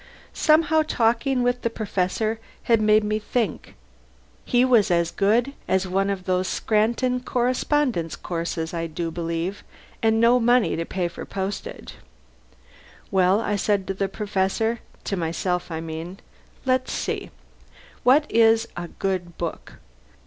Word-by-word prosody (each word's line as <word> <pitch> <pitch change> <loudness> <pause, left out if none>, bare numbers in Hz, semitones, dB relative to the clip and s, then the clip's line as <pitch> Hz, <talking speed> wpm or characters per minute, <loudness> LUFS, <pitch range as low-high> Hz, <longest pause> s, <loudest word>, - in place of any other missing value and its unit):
Somehow, 315 0 +4
talking 250 -1 +1
with 245 0 0
the 230 - 0
Professor 215 0 -1 0.2
had 230 -2 +3
made 215 0 +4
me 215 +1 0
think. 215 -4 -2 0.7
He 245 +1 +3
was 230 -5 +4
as 170 -1 +2
good 230 +7 +2
as 190 0 +1
one 195 +2 0
of 195 -2 -2
those 185 0 0
Scranton 235 +4 +1
correspondence 250 - 0
courses, 165 -1 -4
I 165 -1 -2
do 165 +1 -4
believe, 170 +3 -3 0.4
and 225 0 +3
no 235 +2 +5
money 240 0 +3
to 165 - -2
pay 180 0 -2
for - - -8
postage. 195 +1 -5 1.2
Well, 190 +2 +3
I 210 -2 -1
said 200 -1 +1
to - - +1
the 195 0 -2
Professor 210 +3 -1 0.2
to 195 - -2
myself 175 +1 -2
I 160 -1 -4
mean 165 +4 -6 0.5
let's 255 0 +1
see: - - -3 0.7
what 280 +5 +5
is 225 0 +4
a 175 0 -5
good 180 -2 -3
book? 170 -2 -5
205 Hz, 140 wpm, -24 LUFS, 180-235 Hz, 1.2 s, no